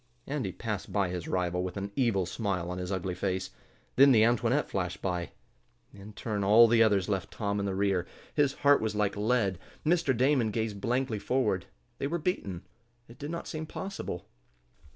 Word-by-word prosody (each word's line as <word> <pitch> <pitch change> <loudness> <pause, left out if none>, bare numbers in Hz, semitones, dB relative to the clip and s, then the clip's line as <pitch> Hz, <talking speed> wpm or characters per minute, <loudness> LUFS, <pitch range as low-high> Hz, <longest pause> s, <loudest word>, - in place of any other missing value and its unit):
Andy 135 -9 -2
passed 105 +1 -5
by 100 -3 +1
his 90 -2 -4
rival 90 -1 0
with 90 +1 -4
an 100 +1 -4
evil 115 -8 +2
smile 90 -2 -2
on 90 - -4
his 90 +1 -4
ugly 95 -1 -2
face. 95 0 -2 0.5
Then 140 +1 +8
the 110 -4 +6
Antoinette 120 +4 +2
flashed 90 -1 -3
by. 90 -2 -2 0.6
In 100 +2 -11
turn 105 -2 -3
all 110 +4 +7
the 115 0 +4
others 100 -4 +4
left 95 -3 -1
Tom 100 -1 -2
in 100 - -1
the 95 - -2
rear. 95 -3 +1 0.3
His 145 -2 +2
heart 145 0 +6
was 110 -1 -1
like 105 -1 +1
lead. 105 -3 +1 0.3
Mr. 155 -6 +2
Damon 130 -2 +3
gazed 110 -2 -2
blankly 120 -2 0
forward. 105 -7 0 0.3
They 140 - -1
were 170 +4 -1
beaten. 125 - -3 0.4
It 120 +2 -15
did 145 - -5
not 170 +1 -5
seem 155 -1 -5
possible. 190 - -5
105 Hz, 185 wpm, -29 LUFS, 95-125 Hz, 0.6 s, Then